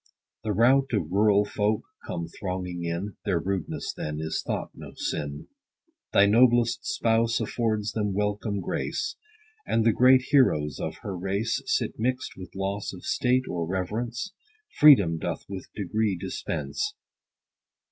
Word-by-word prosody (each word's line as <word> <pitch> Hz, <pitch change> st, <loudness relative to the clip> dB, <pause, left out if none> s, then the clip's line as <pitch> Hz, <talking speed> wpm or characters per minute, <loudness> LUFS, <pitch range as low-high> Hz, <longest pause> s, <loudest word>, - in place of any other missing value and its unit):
The 110 Hz, -, -1 dB
rout 130 Hz, +6 st, +4 dB
of 85 Hz, -7 st, 0 dB
rural 105 Hz, +1 st, +4 dB
folk 105 Hz, +1 st, 0 dB, 0.2 s
come 85 Hz, -, -3 dB
thronging 90 Hz, -1 st, -4 dB
in, 85 Hz, +5 st, -3 dB
(Their 95 Hz, -5 st, +1 dB
rudeness 95 Hz, 0 st, -3 dB
then 75 Hz, 0 st, -4 dB
is 80 Hz, 0 st, -2 dB
thought -, -, -3 dB
no -, -, -10 dB
sin) 75 Hz, -1 st, -4 dB, 0.6 s
Thy 100 Hz, -, +6 dB
noblest 120 Hz, +2 st, +4 dB
spouse 115 Hz, -, +1 dB
affords 110 Hz, -3 st, -1 dB
them 105 Hz, -2 st, -1 dB
welcome 105 Hz, 0 st, -1 dB
grace; -, -, -2 dB, 0.5 s
And 115 Hz, -, +2 dB
the 115 Hz, -, +5 dB
great 130 Hz, +2 st, +6 dB
heroes 75 Hz, -, +3 dB
of -, -, -3 dB
her 100 Hz, -, -4 dB
race 100 Hz, +5 st, -1 dB
Sit -, -, 0 dB
mixt 130 Hz, +5 st, -1 dB
with 95 Hz, 0 st, -11 dB
loss 100 Hz, +1 st, -3 dB
of 90 Hz, -, -10 dB
state, 130 Hz, +1 st, +1 dB
or 85 Hz, -2 st, -2 dB
reverence. 115 Hz, -, -3 dB, 0.5 s
Freedom 100 Hz, -, +7 dB
doth -, -, -4 dB
with 95 Hz, -2 st, -8 dB
degree 105 Hz, 0 st, 0 dB
dispense. 425 Hz, -, -3 dB
105 Hz, 140 wpm, -27 LUFS, 95-115 Hz, 0.6 s, Freedom